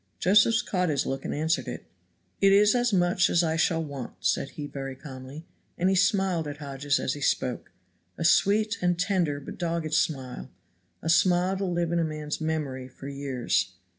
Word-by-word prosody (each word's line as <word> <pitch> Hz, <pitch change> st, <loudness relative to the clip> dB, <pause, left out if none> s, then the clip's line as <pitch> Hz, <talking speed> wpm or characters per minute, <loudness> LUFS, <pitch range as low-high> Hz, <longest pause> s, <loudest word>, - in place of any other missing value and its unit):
Josephs 215 Hz, +5 st, +4 dB
caught 180 Hz, -3 st, 0 dB
his 140 Hz, -3 st, 0 dB
look 135 Hz, 0 st, -4 dB
and -, -, -2 dB
answered 160 Hz, +2 st, 0 dB
it. -, -, -6 dB, 0.6 s
"It 195 Hz, 0 st, +6 dB
is 205 Hz, +1 st, +5 dB
as 245 Hz, -1 st, +1 dB
much 180 Hz, -1 st, +3 dB
as 175 Hz, -, +3 dB
I 160 Hz, -1 st, 0 dB
shall 165 Hz, 0 st, +1 dB
want," 140 Hz, -5 st, -7 dB
said 135 Hz, -, 0 dB
he 150 Hz, -, -4 dB
very 135 Hz, -2 st, -6 dB
calmly, 135 Hz, +2 st, -10 dB, 0.3 s
and 180 Hz, +2 st, +2 dB
he 190 Hz, -, +2 dB
smiled 190 Hz, -4 st, +2 dB
at 145 Hz, 0 st, -6 dB
Hodges 140 Hz, -1 st, -1 dB
as 130 Hz, -, -1 dB
he 145 Hz, -, -8 dB
spoke, 130 Hz, -2 st, -1 dB, 0.5 s
a 165 Hz, -, -2 dB
sweet 210 Hz, +5 st, +3 dB
and 175 Hz, -1 st, +1 dB
tender 175 Hz, -6 st, 0 dB
but 140 Hz, -, -10 dB
dogged 165 Hz, -2 st, -2 dB
smile; 130 Hz, -, -1 dB, 0.5 s
a 160 Hz, -, -2 dB
smile 180 Hz, +2 st, +3 dB
to 195 Hz, -, -2 dB
live 175 Hz, -2 st, -1 dB
in 170 Hz, -, +1 dB
a -, -, +2 dB
man's 155 Hz, -1 st, -4 dB
memory 145 Hz, -5 st, -3 dB
for 130 Hz, +1 st, -11 dB
years. 135 Hz, -8 st, -1 dB
160 Hz, 190 wpm, -27 LUFS, 140-180 Hz, 0.6 s, It